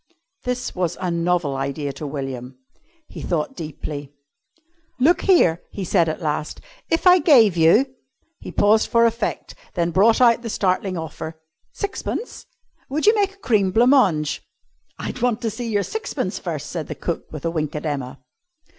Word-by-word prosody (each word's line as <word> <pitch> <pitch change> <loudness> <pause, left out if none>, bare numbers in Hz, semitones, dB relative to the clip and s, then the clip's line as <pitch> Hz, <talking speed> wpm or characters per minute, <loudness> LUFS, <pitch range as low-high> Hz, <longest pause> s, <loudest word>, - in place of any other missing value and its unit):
This 250 0 -2
was 180 -3 -2
a 180 -1 -2
novel 170 -4 0
idea 140 +1 -3
to 150 - -6
William. 135 -3 -6 0.5
He - - -9
thought 170 - -2
deeply. 145 -2 -6 0.9
"Look 315 +8 +4
here!" 180 - +4
he 200 - -5
said 170 -2 +2
at 160 +2 -5
last, 150 0 -2 0.3
"if 330 - 0
I 365 0 +8
gave 245 - +5
you," 170 +10 +5 0.5
he - - -8
paused 215 +2 +3
for 230 0 +4
effect, 230 -1 -2 0.2
then 170 -1 0
brought 205 +6 +4
out 235 -2 +5
the 235 - -5
startling 185 -2 0
offer 160 0 -6 0.3
"sixpence, 420 +3 -5 0.4
would 300 +6 -1
you 430 - +7
make 400 -2 0
a 400 - -22
cream 205 -6 +3
blanc 235 +7 +4
mange?" 165 - +3 0.6
"I'd 250 - -6
want 240 -2 +1
to 225 - 0
see 230 +2 -5
your 205 -2 +1
sixpence 440 - -3
first," - - -5
said - - -4
cook, - - -4
with - - -7
a 165 - 0
wink 155 -3 -2
at 150 - -4
Emma. 135 -3 -3
185 Hz, 165 wpm, -22 LUFS, 155-245 Hz, 0.9 s, I